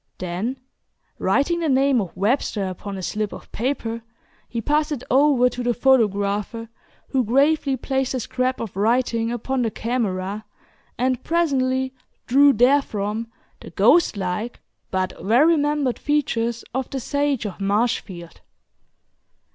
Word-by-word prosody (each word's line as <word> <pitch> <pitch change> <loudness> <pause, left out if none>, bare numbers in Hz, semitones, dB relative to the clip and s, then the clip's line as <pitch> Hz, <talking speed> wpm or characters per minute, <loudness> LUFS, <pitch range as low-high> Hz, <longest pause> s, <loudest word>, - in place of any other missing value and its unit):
Then, 185 +9 -3 0.6
writing 340 +5 +1
the 325 -2 0
name 270 -2 +3
of 185 -2 -7
Webster 210 0 0
upon 190 +2 -6
a 190 - -6
slip 210 +2 -2
of - - -11
paper, 230 -2 -2 0.5
he 235 - -3
passed 300 +6 +1
it 285 -5 -3
over 270 -2 +5
to 250 - -6
the 240 -1 0
photographer, 220 -3 +1 0.4
who 265 -2 +1
gravely 275 +3 +2
placed 265 +1 -1
the 260 - -1
scrap 255 +2 -1
of 225 -5 -6
writing 230 +2 +1
upon 250 +2 -2
the 230 - +1
camera, 210 -4 -2 0.5
and 255 0 0
presently 265 -6 +1 0.3
drew 280 +3 +6
therefrom 230 -4 +1 0.3
the - - -11
"ghost 340 -10 +4
like" 195 +5 -3 0.3
but 185 0 -3
well 230 +8 +4
remembered 295 -5 +1
features 235 -6 0
of 265 0 -2
the 270 - -3
"Sage 285 -2 -1
of 200 -1 -6
Marshfield." 195 -4 -2
245 Hz, 135 wpm, -22 LUFS, 210-270 Hz, 0.6 s, drew